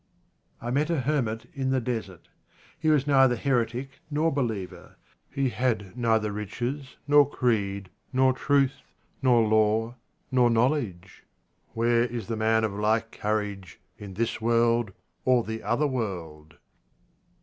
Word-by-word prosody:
I 120 - -4
met 145 +5 +1
a 165 -5 +1
hermit 120 -5 -1
in 135 -3 -2
the 130 0 +2
desert. 115 -7 -5 0.5
He 160 -1 +1
was 150 -3 +3
neither 135 -3 +4
heretic 130 +1 -1
nor 155 +2 +1
believer; 110 -9 -4 0.3
he 135 -1 0
had 110 -4 -1
neither 110 -3 +1
riches, 120 +6 -5
nor 145 -1 +6
creed, 100 -8 -1 0.2
nor 130 0 +3
truth, 135 0 +1 0.4
nor 120 -4 +4
law, 110 +2 +2 0.4
nor 125 -2 +4
knowledge. 115 - -1 0.5
Where 115 +1 +2
is 120 -1 -4
the 115 - -3
man 110 0 +2
of 110 -2 -1
like 110 +2 0
courage 105 -4 -3 0.2
in 100 -2 -9
this 115 +1 -2
world 115 -1 +2 0.3
or 125 -2 +3
the 110 0 -5
other 130 +6 0
world 85 - -4
115 Hz, 135 wpm, -26 LUFS, 110-130 Hz, 0.5 s, nor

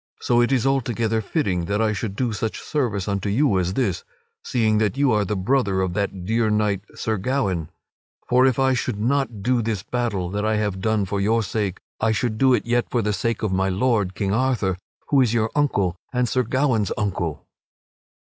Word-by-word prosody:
So 120 0 +2
it 120 - +2
is 130 -3 +2
altogether 115 -4 0
fitting 100 - -1
that 100 +3 -1
I 110 -1 +2
should 100 -1 -4
do 120 -1 -1
such 110 +1 -3
service 115 -11 -2
unto 100 0 -1
you 110 -2 +2
as 90 +1 -1
this, 100 -9 0 0.4
seeing 110 -3 +1
that 105 +2 0
you 140 -2 +3
are 105 -1 +2
the 100 +2 -2
brother 100 -1 +1
of 95 -2 -1
that 100 -2 -3
dear 110 +2 +1
knight, 105 -2 +1
Sir 110 -1 -1
Gawaine. 95 - -1 0.6
For 125 +1 +4
if 130 - +1
I 135 0 +3
should 110 -4 -2
not 120 -3 0
do 125 +1 +2
this 110 -4 -2
battle 105 -8 -2
that 105 +1 -2
I 110 0 +1
have 105 -3 -1
done 110 -1 +1
for 100 +1 -2
your 110 +3 +2
sake, 100 -2 -2 0.2
I 110 0 +2
should 120 +2 0
yet - - -8
do 130 -1 +5
it 120 +2 0
for 120 -2 0
the 105 0 0
sake 115 +4 -2
of 105 -3 0
my 95 +1 +1
lord, 100 -1 +1
King 100 -1 -1
Arthur, 115 -6 +1 0.3
who 140 -2 +4
is 120 -2 +2
your 110 -1 +1
uncle 100 - +1 0.2
and 125 -1 +1
Sir 130 - +1
Gawaine's 125 -4 +1
uncle." 85 -9 -2
110 Hz, 205 wpm, -23 LUFS, 100-125 Hz, 0.6 s, do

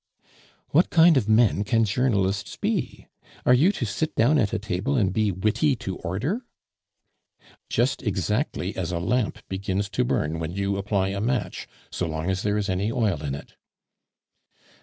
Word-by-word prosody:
"What 170 +5 +3
kind 165 -1 +6
of 115 -6 +1
men 110 -2 +4
can 115 +2 +2
journalists 100 -4 0
be? - - -2 0.4
Are 125 - +6
you 150 +10 +5
to 125 - -2
sit 155 +9 -2
down 145 +7 +4
at 105 -5 +1
a - - 0
table 100 +7 -2
and 100 -5 +1
be 110 -1 +1
witty 110 - +1
to 95 -5 -5
order?" 130 - -2 1.3
"Just 125 +4 +1
exactly 105 - -1
as 90 -2 -3
a 85 - -1
lamp 105 +7 -1
begins 95 +1 -2
to 105 +6 0
burn 80 -9 -1
when 80 +1 -4
you 100 +1 -1
apply 100 -1 0
a 100 0 -3
match 120 0 -2 0.2
so 90 - -2
long 80 +3 -2
as 95 0 -2
there 105 0 0
is 105 -1 -1
any 100 +3 0
oil 105 -11 0
in 70 -2 -2
it." 70 - -11
105 Hz, 170 wpm, -25 LUFS, 95-125 Hz, 1.3 s, kind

